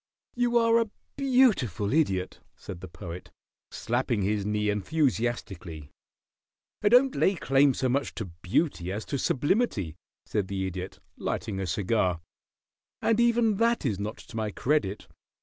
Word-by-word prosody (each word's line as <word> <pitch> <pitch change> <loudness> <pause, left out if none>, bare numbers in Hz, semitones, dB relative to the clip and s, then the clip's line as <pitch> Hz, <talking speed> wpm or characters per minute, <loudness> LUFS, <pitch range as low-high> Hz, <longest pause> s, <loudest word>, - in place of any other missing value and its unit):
"You 240 -1 +2
are 230 0 +4
a 225 - -2 0.3
beautiful 215 - +2
Idiot," 95 - +1 0.2
said 90 -3 -9
the 95 - -7
Poet, 90 0 -9 0.4
slapping 120 -3 -1
his 105 0 0
knee 105 0 +1
enthusiastically. 105 - -2 0.9
"I 205 - +4
don't 255 +3 +5
lay 195 - +2
claim 135 -3 +3
so 130 - 0
much 135 +3 -1
to 110 - -4
beauty 90 - -1
as 105 +3 -4
to 140 - -3
sublimity," 135 - 0 0.3
said 105 -3 -1
the 95 -1 -2
Idiot, 95 0 -6 0.2
lighting 105 -4 -3
a 95 - -2
cigar. 90 0 +1 0.8
"And 225 0 +2
even 235 -3 +3
that 230 -4 +2
is 105 -7 0
not 105 +2 -4
to - - -13
my 110 -1 -1
credit. 115 -3 -1
115 Hz, 145 wpm, -27 LUFS, -, 0.9 s, don't